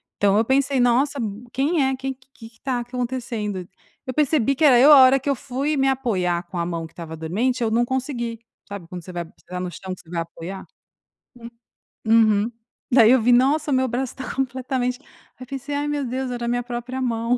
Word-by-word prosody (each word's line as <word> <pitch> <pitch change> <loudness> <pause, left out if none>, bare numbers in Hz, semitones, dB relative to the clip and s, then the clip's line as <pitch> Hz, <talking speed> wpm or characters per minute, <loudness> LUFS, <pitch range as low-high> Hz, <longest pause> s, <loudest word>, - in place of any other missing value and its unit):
Então 200 0 +3
eu 225 - +3
pensei: 275 +1 +2
"Nossa! 260 +4 +2
Hu 215 +2 -5
Quem 285 +4 +1
é 265 0 0
quem 270 +1 -3
que 255 0 -28 0.2
que 230 - -27
está 250 +1 -2
acontecendo?" 235 -6 -4 0.4
Eu 255 - -4
percebi 275 -2 +2
que 310 - -1
era 255 -5 +7
eu 295 +3 +8
a - - +10
hora 265 +1 +6
que 275 +2 -3
eu 275 - +2
fui 280 +3 -2
me 270 -1 +2
apoiar 185 -10 0
com 175 - -7
a 170 - 0
mão 165 -2 -4
que - - -25
estava 160 -2 -8
dormente, 225 +11 -1
eu 230 - +1
não 230 +2 +2
consegui. 245 -3 -3 0.3
Sabe 200 -5 -8
quando 180 -2 -8
você 185 - -9
vai 175 -1 -4
pisar 180 +2 -9
no 180 - -3
chão 185 +2 -7
que - - -11
você 165 - -22
vai 170 -1 -2
apoiar? 170 +3 -8 1.4
Hum. 220 -2 +4
Uhum. 235 - -4 0.4
Daí 235 -2 +7
eu 255 -2 +5
vi 245 +2 +3
"Nossa, 280 +5 +3
o - - +3
meu 260 0 +2
braço 250 +2 -2
está 260 - -7
completamente" 255 -1 -2 0.4
Aí 255 - -8
pensei: 275 +2 -6
"Ai, 290 +1 -1
meu 290 -1 -1
Deus, 255 +1 -3
era 240 -1 -4
a - - -2
minha 245 0 0
própria 245 +2 -5
mão." 235 0 0
245 Hz, 225 wpm, -22 LUFS, 210-265 Hz, 1.4 s, a